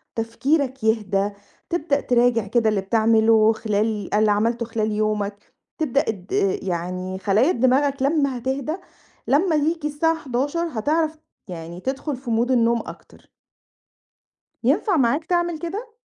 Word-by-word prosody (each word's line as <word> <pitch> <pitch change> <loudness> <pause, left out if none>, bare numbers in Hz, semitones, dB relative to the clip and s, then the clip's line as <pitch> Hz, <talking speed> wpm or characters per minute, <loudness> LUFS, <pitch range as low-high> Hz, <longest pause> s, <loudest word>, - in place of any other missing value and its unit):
تفكيرك 260 +3 -1
يهدى، 205 -3 +1 0.4
تبدأ 305 -4 0
تراجع 240 -3 +2
كده 225 +1 +2
اللي 205 -2 0
بتعمله 220 +1 +4
خلال 215 -1 -1
اللي 210 0 +3
عملته 230 +3 +1
خلال 220 -1 -2
يومك، 210 -1 -2 0.2
تبدأ 280 -4 +1
اد– 195 -4 -6 0.3
يعني 185 +1 -3
خلايا 210 - +3
دماغك 270 +2 +2
لمّا 280 -3 +1
هتهدى، 265 +5 -2 0.5
لمّا 315 +4 +3
ييجي 305 +1 0
الساعة 325 +3 +1
23:00 290 +3 -2
هتعرف، 310 +7 0 0.3
يعني، 170 0 -7
تدخل 270 +2 -3
في 265 - -18
mode 235 +3 +1
النوم 235 -1 +3
أكتر. - - -13 1.3
ينفع 390 -6 +2
معاك 275 +4 +1
تعمل 345 -1 0
كده؟ 415 +8 -6
240 Hz, 125 wpm, -22 LUFS, 215-295 Hz, 1.3 s, بتعمله